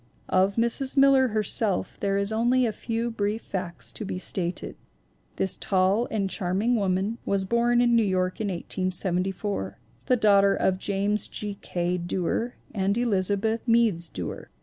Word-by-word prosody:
Of 190 +2 +3
Mrs. 235 +4 0
Miller 270 -1 +6
herself 215 -2 -1
there 195 0 0
are 200 - 0
only 245 +3 +3
a 225 - 0
few 230 +2 -3
brief 210 0 -2
facts 180 -2 -5
to - - -6
be 190 - -4
stated. 180 -1 -4 0.6
This 190 - 0
tall 195 +4 +1
and 205 -3 -1
charming 195 +5 0
woman 200 +2 0
was 195 -1 0
born 240 +3 +2
in 240 -1 +4
New 230 - +5
York 185 -1 0
in 215 - -1
1874, 185 - -2 0.3
the 255 - +4
daughter 200 -3 +4
of 185 -1 +1
James 200 +2 0
G. 210 -1 -5
K. 175 0 -1
Duer 180 +7 -2 0.2
and 200 0 0
Elizabeth 215 -1 +1
(Meads) 225 -8 +2
Duer. 90 -2 -6
200 Hz, 150 wpm, -26 LUFS, 185-230 Hz, 0.6 s, Miller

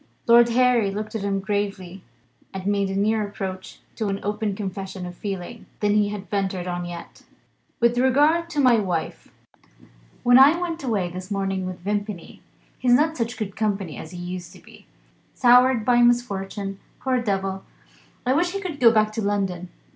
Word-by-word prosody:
Lord 235 0 +6
Harry 245 -3 +3
looked 210 +2 -5
at 220 - -3
him 200 0 -1
gravely, 195 -2 -3 0.5
and 190 -1 -5
made 200 -1 +1
a 195 - -3
nearer 210 +1 +1
approach 190 -2 -7 0.2
to 220 - -1
an 195 0 -2
open 210 0 -2
confession 190 -2 -5
of 180 - -7
feeling 195 +4 -6
than 205 -1 +2
he 210 -1 +2
had 205 -1 -6
ventured 195 -3 -2
on 175 -1 -3
yet. 175 -1 -9 0.6
"With 235 +1 +2
regard 295 +6 +3
now - - -22
to 305 -3 -4
my 245 -4 +5
wife. 180 -5 -3 0.9
When 245 +1 +7
I 290 +6 +7
went 340 -3 -4
away 205 -8 -1
this 185 +2 -8
morning 195 -2 -2
with 185 -1 -7
Vimpany 205 -2 -4 0.4
he's 245 -1 +3
not 315 +5 +3
such 230 -2 -3
good 205 -4 -5
company 200 -6 -2
as 155 - -8
he 180 - -9
used 175 0 -6
to 185 - -14
be; - - -18 0.5
soured 250 -2 +5
by 240 0 +4
misfortune, 200 -5 0 0.2
poor 260 -1 0
devil; 195 -3 -2 0.6
I 255 - +3
wish 350 +5 +1
he 395 0 -4
would 330 -6 -5
go 235 -2 +7
back 215 -1 +2
to 220 - -3
London. 195 -4 -2
205 Hz, 180 wpm, -23 LUFS, 190-240 Hz, 0.9 s, When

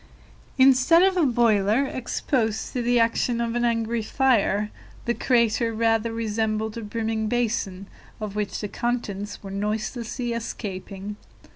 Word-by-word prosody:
Instead 270 +6 +6
of 380 0 +3
a 340 -5 +3
boiler 230 0 +3
exposed 240 -3 -2
to 250 - -1
the 240 0 +2
action 230 +1 +1
of 235 -1 -1
an 240 0 0
angry 230 -1 0
fire, 215 -4 +1 0.3
the 240 - +1
crater 235 -2 +2
rather 225 0 +1
resembled 220 -1 -1
a 230 - -5
brimming 220 0 -2
basin, 215 -5 -1 0.3
of 210 -2 -5
which 210 -1 -2
the 210 - -2
contents 205 -4 -3
were 195 - -7
noiselessly 220 +4 -3
escaping. 205 -3 -5
230 Hz, 135 wpm, -25 LUFS, 210-240 Hz, 0.3 s, Instead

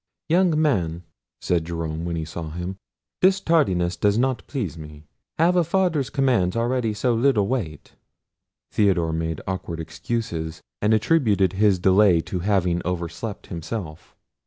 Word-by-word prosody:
"Young 170 -2 +3
man," 90 - 0 0.4
said 85 -2 +1
Jerome, 80 -1 -4
when 85 -1 -2
he 80 -1 -3
saw 80 0 -6
him, 90 +4 -5 0.5
"this 190 +1 +4
tardiness 95 - +2
does 100 +4 +2
not 130 -2 +1
please 115 - -3
me. 75 -2 -11 0.3
Have 170 +3 +3
a 175 - +4
father's 165 -6 +1
commands 120 -10 +1
already 120 -1 0
so 120 +3 +1
little 115 -4 +2
weight?" 95 - -4 0.8
Theodore 90 -6 +2
made 80 0 -2
awkward 95 -3 -4
excuses, 80 -2 -4 0.2
and 105 +2 +4
attributed 105 - +2
his 100 0 +3
delay 95 0 +4
to 90 - -4
having 90 -2 +1
overslept 90 +4 -4
himself. 85 -2 -7
95 Hz, 140 wpm, -23 LUFS, 85-125 Hz, 0.8 s, this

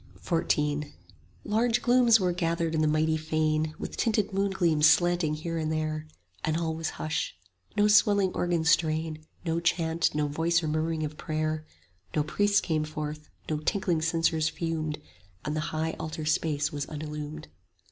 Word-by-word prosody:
XIV 150 -3 0 0.5
Large 230 +2 +1
glooms 240 -2 +5
were 180 -2 +1
gathered 170 -1 -1
in 160 - +1
the 155 - +3
mighty 155 +1 +2
fane, 155 0 0
With - - -6
tinted 215 -3 +1
moongleams 185 -6 +2
slanting 175 -2 +3
here 165 +2 -3
and 155 0 -1
there; 155 0 -2 0.4
And 155 0 0
all 165 -1 -1
was 160 0 -3
hush: 155 - -2 0.4
no 205 0 +5
swelling 205 -2 +4
organ 175 -2 0
strain, 160 -1 +1 0.2
No 165 0 0
chant, 165 -1 +1
no 150 -1 +1
voice 165 +4 +1
or - - -1
murmuring 155 +1 -1
of 150 0 -7
prayer; 155 0 -2 0.5
No 150 - +2
priests 205 +6 +2
came 155 -3 0
forth, 155 0 -6 0.2
no 155 - -1
tinkling 175 0 0
censers 165 -1 +1
fumed, 160 -3 -2
5 150 - -21 0.4
And 150 +1 -2
the - - 0
high 160 +1 -1
altar 155 0 -4
space 150 -1 0
was 145 -1 -3
unillumed. 150 0 -6
160 Hz, 160 wpm, -28 LUFS, 155-170 Hz, 0.5 s, glooms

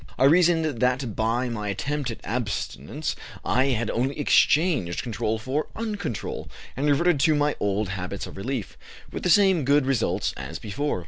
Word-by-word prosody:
I 130 - +2
reasoned 165 +2 +5
that 125 -4 0
by 115 +3 0
my 105 -3 -4
attempt 140 +7 -2
at 115 - -7
abstinence 115 - -3 0.3
I 130 +2 +3
had 120 -4 0
only 130 +5 -1
exchanged 145 - +3
control 110 -1 -1
for 130 +7 -2
uncontrol, 205 - -4 0.3
and 140 +3 -1
reverted 165 +2 +3
to 155 +1 +4
my 145 0 +1
old 100 0 0
habits 95 0 -4
of - - -10
relief, 120 +2 -4 0.3
with - - -5
the - - 0
same 190 -2 +5
good 140 +1 +3
results 135 -2 0
as 80 - -6
before. 115 - -2
130 Hz, 165 wpm, -25 LUFS, 110-150 Hz, 0.3 s, reasoned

